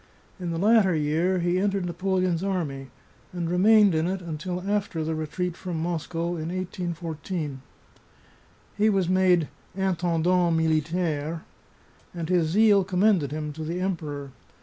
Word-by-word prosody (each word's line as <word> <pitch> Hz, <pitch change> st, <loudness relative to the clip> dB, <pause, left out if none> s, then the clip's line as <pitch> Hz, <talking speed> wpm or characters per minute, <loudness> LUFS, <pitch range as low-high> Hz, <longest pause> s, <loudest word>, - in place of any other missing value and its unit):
In 175 Hz, -2 st, -4 dB
the 165 Hz, -, -2 dB
latter 200 Hz, -1 st, +4 dB
year 160 Hz, +5 st, +1 dB
he 175 Hz, +1 st, +1 dB
entered 195 Hz, -1 st, 0 dB
Napoleon's 185 Hz, 0 st, 0 dB
army, 155 Hz, -9 st, -2 dB, 0.4 s
and 175 Hz, -2 st, -3 dB
remained 200 Hz, +3 st, +5 dB
in 160 Hz, +1 st, +1 dB
it 190 Hz, +1 st, -2 dB
until 180 Hz, +2 st, -5 dB
after 200 Hz, -5 st, -1 dB
the 160 Hz, +1 st, -2 dB
retreat 160 Hz, +3 st, -3 dB
from 175 Hz, -3 st, -5 dB
Moscow 170 Hz, 0 st, -2 dB
m 155 Hz, 0 st, -4 dB
1814. 170 Hz, -4 st, -4 dB, 1.1 s
He 215 Hz, +1 st, +3 dB
was 195 Hz, -4 st, +1 dB
made 180 Hz, -3 st, +3 dB, 0.2 s
" -, -, -30 dB
intendant 175 Hz, -2 st, +1 dB
militaire," 160 Hz, 0 st, 0 dB, 0.7 s
and 170 Hz, -1 st, -4 dB
his 175 Hz, -3 st, +3 dB
zeal 205 Hz, +3 st, +4 dB
commended 185 Hz, -5 st, +2 dB
him 150 Hz, 0 st, -4 dB
to 160 Hz, +2 st, -6 dB
the 170 Hz, +3 st, -3 dB
Emperor. 150 Hz, -7 st, -3 dB
175 Hz, 140 wpm, -26 LUFS, 160-185 Hz, 1.1 s, remained